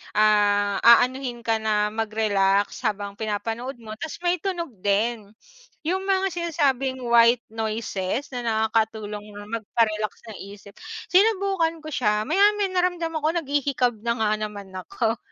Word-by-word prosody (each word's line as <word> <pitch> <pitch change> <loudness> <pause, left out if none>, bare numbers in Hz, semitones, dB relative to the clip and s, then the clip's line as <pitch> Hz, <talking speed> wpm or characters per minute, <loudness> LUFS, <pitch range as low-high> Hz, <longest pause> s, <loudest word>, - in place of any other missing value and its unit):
ah, 205 -1 +3
aanuhin 245 +1 +4
ka 225 -1 +1
na 210 -1 +1
mag-relax 205 -3 +1
habang 200 -2 -2
pinapanood 225 +4 -3
mo 220 -1 -9
tapos 315 +7 -7
may 350 +1 +2
tunog 345 -5 -3
din. 205 +2 0 0.5
Yung 370 +4 -2
mga 390 0 +1
sinasabing 280 -7 -1
white 235 0 +5
noises 220 +1 -3
na 245 -2 -5
nakakatulong 220 -2 -1
na 205 0 -10
magpa-relax 215 -1 -1 0.2
ng 215 - -8 0.2
isip, 200 0 -15 0.3
sinubukan 385 -5 +2
ko 310 - -8
siya 210 -7 +1
maya-maya 400 - +3
naramdam 355 -2 0
ako 305 0 -1
naghihikab 280 -4 0
na 235 - +2
nga 215 - +2
naman 210 -2 -6
ako. 225 +5 -2
230 Hz, 135 wpm, -24 LUFS, 210-305 Hz, 0.5 s, white